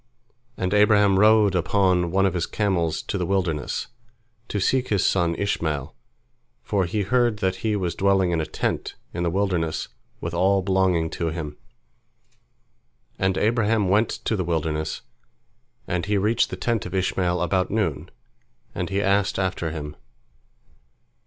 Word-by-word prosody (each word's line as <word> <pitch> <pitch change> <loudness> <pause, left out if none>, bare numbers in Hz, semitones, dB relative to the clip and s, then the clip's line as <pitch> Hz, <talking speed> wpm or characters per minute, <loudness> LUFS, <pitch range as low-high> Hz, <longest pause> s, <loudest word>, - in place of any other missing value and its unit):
And 95 +1 -1
Abraham 105 -2 +4
rode 105 -1 +5
upon 90 -1 +2
one 95 +3 +2
of 95 - +1
his 90 -2 -1
camels 90 -6 -1
to - - -3
the - - 0
wilderness, 90 -6 -1 0.6
to 105 - -2
seek 130 +6 +1
his 100 -3 +1
son 85 -3 +2
Ishmael, 80 -8 -2 0.7
for 100 -3 0
he 100 +4 -1
heard 120 +2 +2
that 95 -2 -1
he 110 +1 -1
was 90 -4 -1
dwelling 95 -2 +2
in 85 -2 +1
a 80 - -4
tent - - -3 0.2
in 85 - -3
the 85 - +1
wilderness 90 -4 -1 0.3
with 85 - -5
all 95 +2 +2
belonging 95 -4 +1
to 85 - -2
him. 80 -2 -4 1.6
And 95 -1 +1
Abraham 110 -3 +2
went 105 +4 +3 0.2
to 110 - +1
the 95 - -1
wilderness, 80 -2 -2 0.8
and 90 +1 -2
he 105 0 +1
reached 105 +4 +2
the - - -4
tent 115 -5 -1
of 90 - -6
Ishmael 90 -1 0
about 90 +2 0
noon, 105 -9 -1 0.6
and 90 - -3
he 100 +1 0
asked 100 0 +1
after 95 -3 -1
him. 75 -2 -6
95 Hz, 150 wpm, -24 LUFS, 85-100 Hz, 1.6 s, rode